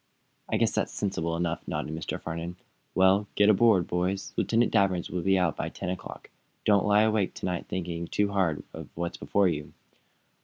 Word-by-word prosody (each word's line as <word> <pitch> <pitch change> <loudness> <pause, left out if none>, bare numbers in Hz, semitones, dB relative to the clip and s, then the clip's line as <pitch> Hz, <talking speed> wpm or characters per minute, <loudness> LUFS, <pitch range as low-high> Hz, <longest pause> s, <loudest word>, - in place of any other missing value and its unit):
"I - - +1
guess - - +2
that's - - -1
sensible 85 -5 -2
enough," 85 -1 -2
nodded 75 - -3
Mr. 80 - -4
Farnum. 85 +2 -5 0.4
"Well, 95 +2 +4
get 105 0 +5
aboard, 105 -4 +4
boys. 90 +2 -2
Lieutenant 115 +1 +2
Danvers 95 -5 +1
will 90 - -2
be 95 +1 +3
out 90 -5 +1
by - - -3
ten - - -5
o'clock. 90 -2 -8 0.3
Don't 100 -2 +4
lie 105 +1 +5
awake 110 -3 +1
to - - -5
night, 90 -2 -2
thinking 85 -2 -4
too 100 +2 0
hard 90 -7 0
of - - -8
what's 85 0 -3
before 100 -1 +2
you." 75 -4 -3
95 Hz, 185 wpm, -28 LUFS, 85-100 Hz, 0.4 s, get